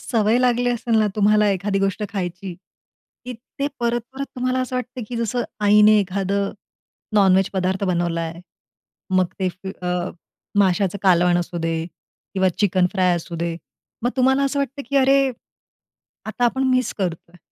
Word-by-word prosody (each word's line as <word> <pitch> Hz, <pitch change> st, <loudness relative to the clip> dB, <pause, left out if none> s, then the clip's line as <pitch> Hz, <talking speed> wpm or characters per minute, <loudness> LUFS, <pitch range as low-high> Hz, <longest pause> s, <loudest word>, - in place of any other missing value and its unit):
सवय 225 Hz, -1 st, +1 dB
लागली 245 Hz, -1 st, +2 dB
असेल 235 Hz, -1 st, 0 dB
ना 215 Hz, -, +3 dB
तुम्हाला 210 Hz, 0 st, +4 dB
एखादी 195 Hz, +1 st, -1 dB
गोष्ट 195 Hz, +2 st, -1 dB
खायची, 180 Hz, -1 st, -4 dB, 0.7 s
की 250 Hz, -, -5 dB, 0.3 s
ते 280 Hz, -, 0 dB
परत-परत 240 Hz, +3 st, -2 dB
तुम्हाला 255 Hz, +1 st, 0 dB
असं 255 Hz, 0 st, -3 dB
वाटतं, 250 Hz, 0 st, -5 dB
की 240 Hz, -, -5 dB
जसं 235 Hz, +1 st, -1 dB, 0.2 s
आईने 210 Hz, +1 st, +6 dB
एखादं 195 Hz, +1 st, -1 dB, 0.6 s
नॉन-व्हेज 195 Hz, -2 st, +4 dB
पदार्थ 190 Hz, +1 st, -1 dB
बनवला 175 Hz, -2 st, 0 dB
आहे. 165 Hz, +1 st, -5 dB, 0.7 s
मग 185 Hz, -1 st, +4 dB
ते 185 Hz, -, +1 dB
फी 190 Hz, +1 st, -8 dB
अ, 180 Hz, 0 st, -1 dB, 0.5 s
माशाचं 195 Hz, 0 st, +2 dB
कालवण 175 Hz, -2 st, +4 dB
असू 175 Hz, 0 st, -4 dB
दे 165 Hz, 0 st, -1 dB, 0.6 s
किंवा 190 Hz, -1 st, +3 dB
चिकन 185 Hz, -3 st, +3 dB
फ्राय 185 Hz, -2 st, +2 dB
असू 170 Hz, +1 st, -6 dB
दे. 170 Hz, 0 st, -2 dB, 0.5 s
मग 245 Hz, -, +1 dB
तुम्हाला 265 Hz, +2 st, +3 dB
असं 275 Hz, +1 st, -1 dB
वाटतं, 280 Hz, 0 st, -3 dB
की 280 Hz, -, 0 dB
अरे! 270 Hz, 0 st, +4 dB, 1.0 s
आता 245 Hz, +3 st, -1 dB
आपण 265 Hz, +3 st, +1 dB
मिस 255 Hz, -2 st, +1 dB
करतो 170 Hz, -2 st, -3 dB
आहे. 180 Hz, -, -18 dB
200 Hz, 160 wpm, -21 LUFS, 180-245 Hz, 1.0 s, आईने